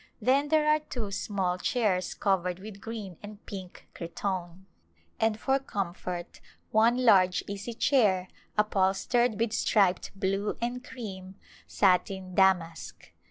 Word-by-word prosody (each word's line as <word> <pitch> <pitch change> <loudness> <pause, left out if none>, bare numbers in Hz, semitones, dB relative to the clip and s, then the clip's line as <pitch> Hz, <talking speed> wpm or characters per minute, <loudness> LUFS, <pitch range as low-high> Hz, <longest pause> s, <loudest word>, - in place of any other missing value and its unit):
Then 275 +3 +3
there 305 0 +3
are 305 0 +4
two 240 -8 -5
small 190 -3 -1
chairs 195 -7 0
covered 180 -3 0
with 200 +1 -10
green 210 -6 -7
and 205 0 -11
pink 190 -3 -9
cretonne, 185 -1 -4 0.5
and 220 -1 +1
for 270 +3 +1
comfort 180 -7 -5 0.3
one 235 +3 +3
large 185 -5 +5
easy 205 +4 -6
chair 205 -9 +3 0.3
upholstered 210 +3 +2
with 230 -1 0
striped 200 -5 +2
blue 195 +1 -1
and 245 +2 -3
cream 190 -7 -8 0.3
satin 190 -1 +1
damask. 180 -4 +1
200 Hz, 120 wpm, -28 LUFS, 185-230 Hz, 0.5 s, large